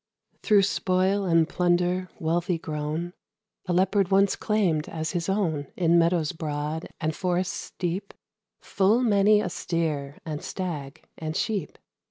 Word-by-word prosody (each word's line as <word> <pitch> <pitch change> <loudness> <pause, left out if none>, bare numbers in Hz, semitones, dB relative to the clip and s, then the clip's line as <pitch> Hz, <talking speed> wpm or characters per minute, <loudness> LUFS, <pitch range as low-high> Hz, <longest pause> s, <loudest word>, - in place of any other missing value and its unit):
Through 205 -2 +4
spoil 190 +1 +1
and 165 -2 +3
plunder, 180 +1 +1
wealthy 170 +2 0
grown, 155 +2 -4 0.5
A 180 - 0
Leopard 190 +1 +2
once 195 0 +4
claimed 185 -8 0
as 160 -1 -3
his 175 0 -2
own, 165 -8 0
In 170 -1 +4
meadows 165 -2 +2
broad, 155 -1 -4
and 155 -1 -1
forests 180 0 -2
deep, 185 +3 -3 0.5
Full 210 +5 +2
many 210 -1 +4
a - - -2
steer, 150 -5 -2
and 155 -2 -4
stag, 160 -6 -5 0.2
and 155 0 -4
sheep. 205 -8 -2
175 Hz, 135 wpm, -26 LUFS, 160-190 Hz, 0.5 s, Through